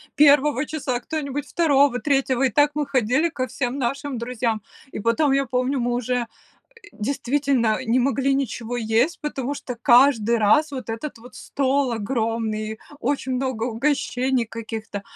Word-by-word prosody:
1, 290 -2 +3
кто-нибудь 290 0 -4
2, 285 -6 +3
3 270 -3 +1
и 265 - +4
так 290 +2 +3
мы 300 -1 -1
ходили 265 +4 +1
ко 260 -5 -3
всем 250 +1 -3
нашим 275 +2 -2
друзьям. 235 -2 -2 0.3
И - - -5
потом, 250 +7 +2
я 275 0 +2
помню, 255 +2 -1
мы 240 0 0
уже, 245 +1 -1
э, 240 -2 -1 0.7
действительно 255 0 0
не 240 0 +1
могли 275 +1 +1
ничего 245 -2 -3
есть, 235 +8 +1
потому 285 -2 -3
что 250 - -6
каждый 235 -1 +4
раз 290 +9 +3
вот 260 -4 -6
этот 230 +6 -6
вот 245 +2 -15
стол 275 -1 0
огромный, 220 -1 -2 0.2
очень 265 0 -1
много 255 -3 -2
угощений 255 0 0
каких-то. 220 -2 -6
255 Hz, 145 wpm, -23 LUFS, 235-280 Hz, 0.7 s, и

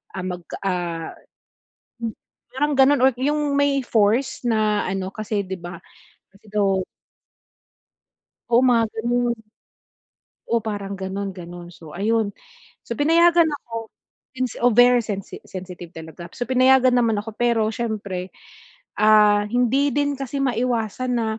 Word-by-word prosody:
ah, 185 - -4
mag, 180 -1 -5 0.2
ah 175 -3 -2 0.9
Hmm. 225 - -1 0.4
Parang 295 +3 0
ganun 270 0 +5
or 265 - +7
'yung 290 +1 0
may 285 -1 +2
force 225 +5 +1
na 215 -3 +1
ano 190 0 -2
kasi 215 -1 -2
'di 190 0 -4
ba, 175 0 -8 0.5
kasi 200 +2 -22
daw 195 -2 +2 1.7
Oo, 235 +1 +5
mga 240 -3 +4
ganun. 240 +1 0 1.1
Oo, 235 -1 +1
parang 200 -2 -4
ganon 195 0 -4
ganon. 175 -1 -10
So 160 -3 -13
ayun. 220 +1 +1 0.6
So 235 - -4
pinayagan 335 +2 +5
ako 230 -6 -6 0.5
since 255 -2 -3
oh 245 - +5
very 245 +1 +6
sensi 200 -3 -6
sensitive 180 -2 -8
talaga. 165 +2 -9
So, 245 - -2
pinayagan 255 0 +5
naman 230 -3 +2
ako, 220 +1 -7
pero 235 -2 +2
siyempre, 200 -5 -4 0.7
ah, 210 -1 +5
hindi 250 +4 +2
din 285 -1 +1
kasi 275 +1 -4
maiwasan 245 -1 -1
na 225 -1 0
225 Hz, 130 wpm, -22 LUFS, 195-255 Hz, 1.7 s, or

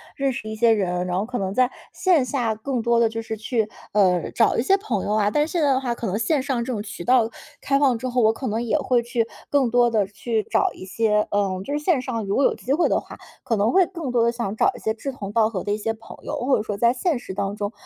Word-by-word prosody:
认 275 -1 0
识 225 -3 -6
一 220 - -4
些 230 +1 +4
人， 180 -4 0
然 180 0 -1
后 200 - -1
可 245 +2 -4
能 190 -1 -2
在 255 +2 +3 0.2
线 360 -8 +3
下 245 -3 -1
更 245 +3 -3
多 235 +1 +2
地 230 - +4
就 225 +1 -4
是 225 0 -5
去， 220 0 -1 0.2
呃， 185 -4 +2
找 230 - +3
一 - - +3
些 385 +9 +4
朋 235 - -2
友 - - -2
啊。 210 -1 +2
但 295 +4 +2
现 340 0 -1
在 290 - +3
的 260 - +2
话 245 -3 -1
可 235 - -5
能 195 +2 -1
线 270 +6 +1
上 260 -3 -1
这 255 - -4
种 220 -4 -2
渠 205 -4 -7
道 240 +1 +3 0.3
开 275 - +1
放 265 -4 +3
之 255 +3 -4
后， 250 0 +1
我 220 -1 +5
可 255 +4 -5
能 220 +2 -1
也 240 +5 +1
会 255 -4 +1
去 235 -1 -1 0.2
更 275 -4 +2
多 240 0 +4
地 215 -3 +1
去 215 +2 -2
找 - - +2
一 - - -10
些 210 +2 +1
嗯， 195 -2 0
就 285 - -4
是 295 - 0
线 300 -3 +1
上 230 -4 -3
如 195 - -1
果 275 - +4
有 - - +3
机 265 - -2
会 335 +4 +3
的 - - +2
话， - - -12 0.3
可 230 - 0
能 205 +3 +2
会 375 0 +5
更 335 -8 -5
多 240 -1 +2
地 235 - +3
想 235 -4 -3
找 - - +3
一 - - -11
些 220 - -1
志 275 +5 -5
同 205 -6 -7
道 220 -1 +3
合 195 -5 -4
的 205 - -1
一 - - -1
些 220 +1 -2
朋 225 +1 -12
友。 - - -4
或 270 - +4
者 - - -1
说 205 -2 -4
在 235 +3 +3
现 295 +4 0
实 240 -5 -8
当 195 +1 -2
中 205 -1 -3
230 Hz, 315 characters per minute, -23 LUFS, 210-260 Hz, 0.3 s, 我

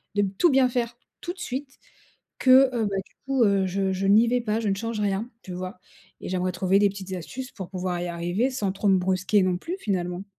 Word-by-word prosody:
de 205 - +3 0.2
tout 345 - +5
bien 260 -1 +4
faire 240 -1 -2 0.3
tout 350 - -4
de 370 - -18
suite, 270 -3 -5 0.6
que, 260 0 +6
heu, 225 -2 +1
bah, 200 -1 -2
du - - -25
coup, 270 -3 +3
heu, 200 -2 +3
je 190 +1 0
je 190 +1 -1
n'y 220 +4 +5
vais 250 0 +2
pas, 220 0 -1
je 215 - -1
ne 195 - +2
change 230 +2 -4
rien, 205 +4 -1
tu 185 - -8
vois? 185 +1 -6 0.4
Et - - -5
j'aimerais 185 0 -1
trouver 190 +2 +2
des 205 - +5
petites 190 -1 -8
astuces 250 +9 -7
pour 190 -4 -7
pouvoir 180 -2 -3
y - - -2
arriver 175 +8 -1
sans 210 -7 -1
trop 200 +1 -1
me 190 - +5
brusquer 185 +2 +2
non 180 -1 +1
plus, 350 - -5
finalement. 180 -2 -2
200 Hz, 235 wpm, -25 LUFS, 185-240 Hz, 0.6 s, que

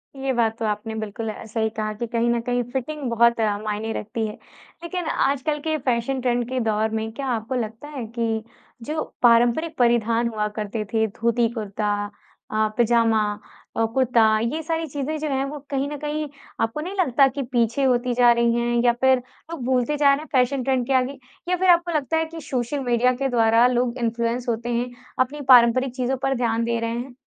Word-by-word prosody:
ये 270 0 -2
बात 225 -2 +1
तो 225 - -1
आपने 215 +1 -3
बिल्कुल 220 +1 -4
अ, 215 - -7
सही 220 0 -1
कहा 215 -1 -3
कि 235 +3 -4
कहीं 235 +1 0
न 235 0 +2
कहीं 245 +1 -1
फ़िटिंग 285 +4 -4
बहुत 235 0 +3 0.2
मायने 215 +1 -3
रखती 220 +1 -3
है। 210 - -6 0.5
लेकिन 355 0 -4
आजकल 285 +2 0
के 315 0 +1
फ़ैशन 255 0 -1
ट्रेंड 245 -1 0
के 260 0 -1
दौर 220 0 +1
में 220 0 -4
क्या 275 +3 -5
आपको 235 0 -2
लगता 225 +3 -4
है 270 -6 -5
कि, 225 -1 0 0.4
जो 305 +7 -3 0.2
पारंपरिक 240 +7 +4
परिधान 235 -1 +2
हुआ 215 -2 -1
करते 215 +1 -3
थे 220 -1 +3
धोती-कुर्ता 220 -2 -1 0.6
अ, 215 0 +2
पजामा 230 -2 +3 0.6
अ, 225 - +3
कुर्ता 250 -2 +3 0.2
ये 235 +8 -1
सारी 325 +1 -2
चीज़ें 290 +2 -3
जो 310 - -2
हैं 270 -1 0
वो 290 +2 -6
कहीं 275 0 -1
न 295 - -5
कहीं 300 +1 -3 0.3
आपको 225 +6 -1
नहीं 360 +5 -5
लगता 275 -5 +4
कि 270 +2 -4
पीछे 240 +2 +1
होती 250 -1 +2
जा 240 0 +5
रही 235 0 +3
हैं 240 0 +1
या 240 - +5
फिर 265 0 +5 0.3
लोग 330 -7 -5
भूलते 260 +3 +1
जा 285 -1 +5
रहे - - +1
हैं, - - -13
फ़ैशन 260 0 +2
ट्रेंड 260 -1 +1
के 270 - +1
आगे? 260 +1 +1 0.3
या 360 - +3
फिर 370 +1 +2
आपको 345 0 +4
लगता 305 +2 0
है 320 - +1
कि 325 0 -9
सोशल 260 0 -2
मीडिया 245 0 +2
के 270 +2 -1
द्वारा 230 -1 +4
लोग 250 0 0
इंफ्लुएंस 235 +1 -1
होते 235 +1 -2
हैं, 240 +1 -1 0.3
अपनी 270 +3 0
पारंपरिक 250 +1 +5
चीज़ों 260 +1 -1
पर 270 0 +1
ध्यान 230 -2 0
दे 235 0 0
रहे 230 0 -2
हैं? 245 +1 -6
240 Hz, 200 wpm, -23 LUFS, 230-270 Hz, 0.6 s, जा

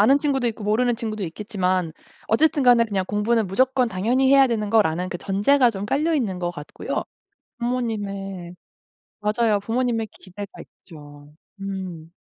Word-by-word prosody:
아는 270 +7 +6
친구도 275 -4 0
있고 215 -2 -6
모르는 235 +3 +2
친구도 215 -4 -4
있겠지만 185 -2 -1 0.3
어쨌든 300 +5 +3
간에 240 -2 +6
그냥 195 -4 -1
'공부는 215 +1 +1
무조건 255 +6 +2
당연히 235 +7 +1
해야 275 -1 +7
되는 215 -4 -1
거.'라는 180 -5 +2
그 175 - -4
전제가 235 +6 +3
좀 200 -1 -5
깔려 305 +9 +1
있는 215 -11 -1
것 175 -1 -2
같고요. 150 -4 -5 0.6
부모님의 200 -7 -3 0.7
맞아요. 210 0 +2
부모님의 230 +1 -1
기대가 195 +2 -9 0.4
있죠. 145 -3 -14 0.3
음. 185 -4 -6
210 Hz, 345 characters per minute, -23 LUFS, 185-245 Hz, 0.7 s, 해야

